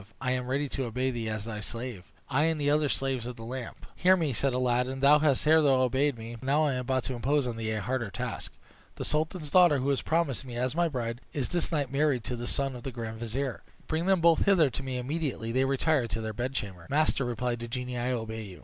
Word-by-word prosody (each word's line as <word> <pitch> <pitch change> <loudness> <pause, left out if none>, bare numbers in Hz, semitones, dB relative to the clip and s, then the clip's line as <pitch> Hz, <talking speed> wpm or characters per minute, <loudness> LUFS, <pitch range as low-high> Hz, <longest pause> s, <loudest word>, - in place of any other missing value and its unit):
I 130 -1 -1
am 125 -1 -1
ready 140 +3 0
to 135 -1 -2
obey 125 +3 -1
thee 115 -3 -3
as 110 -1 -3
thy 110 -2 -5
slave; 115 -3 -6 0.2
I 145 +3 +2
and 160 -1 +1
the 145 0 +2
other 150 -1 +2
slaves 130 -4 -1
of 125 - -6
the 115 - -10
lamp." 125 0 -6
"Hear 185 +1 +5
me," 155 -6 0
said 135 +4 +1
Aladdin. 125 +1 0
"Thou 145 +2 +6
hast 145 -4 +2
hitherto 155 0 +5
obeyed 130 +1 +2
me; 115 +1 -7
but 115 - -15
now 145 +4 +3
I 145 - +1
am 125 - -1
about 130 0 0
to 130 - -3
impose 135 +3 +1
on 120 -2 -3
thee 110 -1 -3
a 110 -1 -1
harder 120 -2 -1
task. - - -4 0.4
The - - -5
sultan's 155 0 -1
daughter, 175 -5 +6
who 130 - -2
was 140 -2 +1
promised 160 -6 0
me 125 -3 -8
as 125 +2 -1
my 170 +2 +2
bride, 120 -4 -3
is 140 -4 -1
this 175 0 -1
night 145 -5 -1
married 140 -4 +1
to 125 +3 -3
the 120 0 -5
son 135 -1 -1
of 125 - -8
the 135 - -5
grand 115 -2 -6
vizier. 125 +3 -3 0.2
Bring 165 +3 -1
them 190 -3 +4
both 165 -1 +5
hither 170 -9 +5
to - - -4
me 130 -1 -3
immediately 130 -3 -2
they 130 +2 +2
retire 135 -1 +2
to 115 0 -3
their 110 0 -4
bedchamber." 105 -8 -4
"Master," 150 -1 +2
replied 120 0 -2
the 120 - -5
genie, 125 +1 -4
"I 120 +1 -1
obey 110 -2 -3
you." 95 -4 -10
130 Hz, 250 wpm, -29 LUFS, 120-145 Hz, 0.4 s, Thou